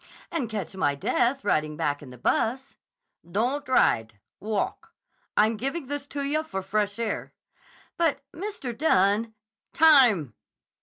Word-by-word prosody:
"And 275 -9 -2
catch 205 -4 -5
my 145 -6 +1
death 245 - 0
riding 155 -5 0
back 145 -1 -1
in 140 - -11
the 125 - -12
bus." 255 - -1 0.5
"Don't 235 +12 -1
ride. 110 - +2 0.2
Walk. 210 -1 -3 0.4
I'm 220 +1 +4
giving 275 +7 -3
this 285 +1 -4
to 285 0 -4
yah 295 +3 +1
for 195 -12 -5
fresh 205 +1 -1
air." 230 -2 -3 0.6
"But 320 -5 +1
Mr. 340 - -5
Dunne—" 220 -5 +2 0.4
"Time!" 245 - +5
225 Hz, 135 wpm, -26 LUFS, 190-280 Hz, 0.6 s, Time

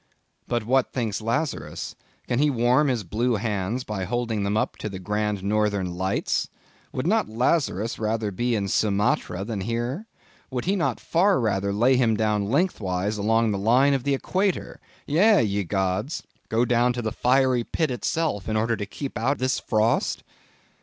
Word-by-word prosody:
But 120 -3 -1
what 130 +2 +2
thinks 115 -5 -2
Lazarus? 140 +7 -3 0.3
Can 120 - 0
he 150 +1 +4
warm 125 +3 +3
his 125 -5 0
blue 115 +7 0
hands 105 +2 -2
by 105 -5 -4
holding 120 -1 -1
them 100 +1 0
up - - 0
to 110 - -4
the 95 - -6
grand 105 0 -2
northern 100 -3 0
lights? 95 +2 -1 0.4
Would 130 - -3
not 220 +5 +2
Lazarus 115 - 0
rather 110 -1 -1
be 120 +5 0
in 100 -2 -1
Sumatra 100 -2 +1
than 105 -3 -3
here? 120 - -3 0.4
Would 125 -2 -3
he 195 +3 +2
not 175 - 0
far 185 +2 +2
rather 100 -4 0
lay 120 +6 +3
him 115 -4 +2
down 105 -2 +1
lengthwise 105 - 0
along 115 +2 +2
the 100 - -1
line 125 +7 +4
of 135 -3 0
the 140 +1 +1
equator; 190 +7 -1 0.3
yea, 190 - +4
ye 100 -1 0
gods! 95 - -1 0.3
go 115 +2 +2
down 120 +1 +2
to 120 0 -4
the 110 - -1
fiery 125 0 +2
pit 155 +3 -1
itself, 125 - -1
in 110 - +1
order 115 +2 +1
to 100 -1 -5
keep 135 -2 -5
out 130 +5 +1
this 130 +1 0
frost? 110 0 +1
115 Hz, 175 wpm, -25 LUFS, 105-130 Hz, 0.4 s, he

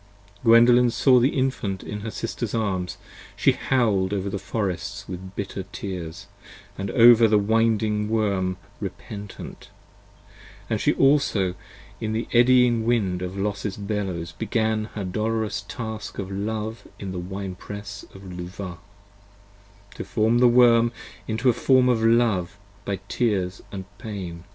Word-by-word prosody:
70 - - -30
Gwendolen 120 +2 +6
saw 125 +2 +4
the 125 +3 +4
Infant 120 -8 -1
in 105 - -5
her 110 +2 -5
sister's 115 +1 -4
arms: 95 -5 -2 0.4
she - - +4
howl'd 105 -7 +1
Over 100 0 -2
the 100 - -3
forests 100 -1 -3
with 95 +1 -8
bitter 100 -1 -4
tears, 90 -1 -6 0.5
and 100 0 -4
over 115 0 +7
the 110 -1 +4
winding 110 0 +1
Worm, 100 -4 0 0.2
Repentant: 100 +1 -8 1.0
and - - 0
she - - +3
also 135 -10 +3 0.5
in 110 0 -2
the 115 +2 -2
eddying 120 -1 +5
wind 105 -6 +1
of 90 +1 -5
Los's 100 0 -2
Bellows 100 -5 -3
Began 110 +3 -1
her 105 - -3
dolorous 110 +3 -1
task 110 +1 -6
of 95 -1 -5
love 110 +3 -4
in 95 -2 -6
the 90 - -4
Wine 95 +1 -5
press 100 +2 -8
of 95 - -11
Luvah, 90 0 -7 1.1
To - - -6
form 110 +1 +1
the 125 - +6
Worm 120 -1 +5 0.4
into 115 +3 -1
a 125 - +6
form 130 +1 +4
of 120 -3 +2
love 110 -6 +2 0.3
by 100 - -1
tears 100 -6 -1 0.2
& 95 - -18
pain. 90 -6 -6
105 Hz, 140 wpm, -24 LUFS, 95-115 Hz, 1.1 s, over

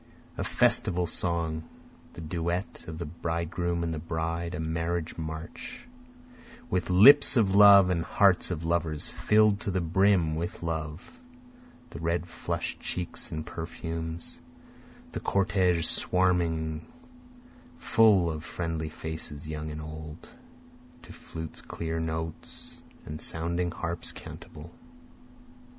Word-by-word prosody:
A - - -3
festival 90 -1 +3
song, 85 -2 -1 0.5
The - - -9
duet 85 +3 -3
of 80 -1 -6
the 85 - -4
bridegroom 85 +1 -2
and 85 -1 -2
the 80 - -3
bride, 85 +2 -3
a - - -5
marriage 80 +1 -2
march, 80 - -7 0.8
With 90 -1 0
lips 130 +9 +8
of 100 -5 +3
love, 100 -2 +8
and 85 -2 0
hearts 95 +1 +3
of 85 -2 -3
lovers 80 -3 -1
fill'd 105 -1 +3
to 105 - -3
the 95 -1 0
brim 90 -1 +3
with 85 +2 -4
love, 80 0 -4 0.8
The - - -7
red 85 +2 -1
flush'd - - -4
cheeks 90 -1 -4
and 80 0 -4
perfumes, 80 0 -5 0.7
the - - -4
cortege 95 -3 +2
swarming 85 -4 +1 0.9
full 105 -8 +4
of 80 0 -6
friendly 80 -2 -3
faces 75 -2 -6
young 80 0 -4
and 75 0 -6
old, 80 0 -9 0.7
To - - -11
flutes' 80 -1 -8
clear 80 0 -4
notes 80 0 -5 0.2
and 75 0 -6
sounding 85 +2 -1
harps' 85 0 -3
cantabile. 75 +3 -10
85 Hz, 120 wpm, -28 LUFS, 80-90 Hz, 0.9 s, lips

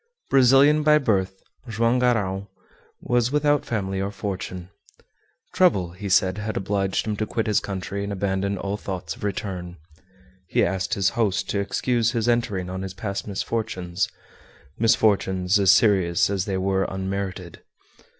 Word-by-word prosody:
Brazilian 135 +3 +5
by 150 0 +5
birth, 95 -8 -1 0.3
Joam 115 +3 +1
Garral 100 -5 0 0.5
was 120 0 +1
without 145 0 +2
family 95 -4 -2
or 100 - -1
fortune. 95 -3 -6 0.8
Trouble, 100 - +3
he 100 +3 -7
said, 95 +1 +3
had 105 +1 -3
obliged 95 0 -1
him 110 -1 -2
to 110 - -2
quit 115 +1 -2
his 105 -2 +2
country 100 0 -4
and 100 - -4
abandon 100 0 -1
all 100 +2 -3
thoughts 90 -5 -5
of - - -14
return. 90 -3 -4 0.7
He - - +2
asked 95 0 -1
his 95 -1 +2
host 110 -5 -1
to 100 - 0
excuse 115 +3 0
his 115 -1 -1
entering 110 -6 0
on 95 +1 -5
his 95 0 -6
past 100 -1 -4
misfortunes 100 -3 -2 0.7
misfortunes 100 -3 +2
as 95 -2 +6
serious 95 -3 +3
as 95 -1 -1
they 95 -2 -2
were 95 0 0
unmerited. 95 -2 -5
100 Hz, 150 wpm, -24 LUFS, 95-110 Hz, 0.8 s, as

